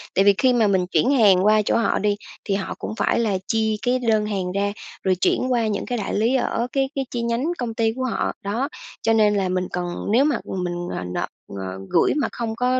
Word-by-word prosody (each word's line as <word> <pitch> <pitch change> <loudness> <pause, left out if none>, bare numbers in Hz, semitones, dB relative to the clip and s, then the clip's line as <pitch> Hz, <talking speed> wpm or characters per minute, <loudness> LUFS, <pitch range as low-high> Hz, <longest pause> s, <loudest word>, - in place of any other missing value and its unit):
Tại 195 - +4
vì 200 - +7
khi 255 -1 +4
mà 230 -3 +3
mình 185 -3 +1
chuyển 250 +8 +2
hàng 200 -8 +5
qua 215 0 +5
chỗ 210 - +1
họ 230 - +1
đi 205 0 +1 0.3
thì 195 -2 0
họ 195 - -3
cũng - - -4
phải - - +1
là 210 -5 +1
chi 220 -2 +1
cái 255 +1 +1
đơn 220 -3 +2
hàng 195 -4 -2
ra, 200 +1 0 0.3
rồi 185 -1 +2
chuyển 255 +7 +1
qua 235 -3 +2
những 205 -2 -2
cái 245 - -2
đại 210 - -3
lý 225 +5 +2
ở 245 -1 0
cái 270 -1 0
cái 270 -1 -1
chi 240 - -2
nhánh 235 +7 0
công 240 -2 -3
ty 225 -1 +1
của 260 - -3
họ. 245 - -1
Đó, 230 +8 -1 0.3
cho 225 - +2
nên 210 -2 +4
là 190 -2 0
mình 185 0 -1
cần 175 -1 -3 0.2
nếu 255 +5 +5
mà 295 - +2 0.3
mình, 175 0 -3
ờ, - - -4
nộp, - - -2 0.2
ờ, 95 -1 -6
gửi - - +3
mà 295 - +1
không 225 -2 -4
có 250 +1 +1
220 Hz, 250 wpm, -22 LUFS, 195-245 Hz, 0.3 s, vì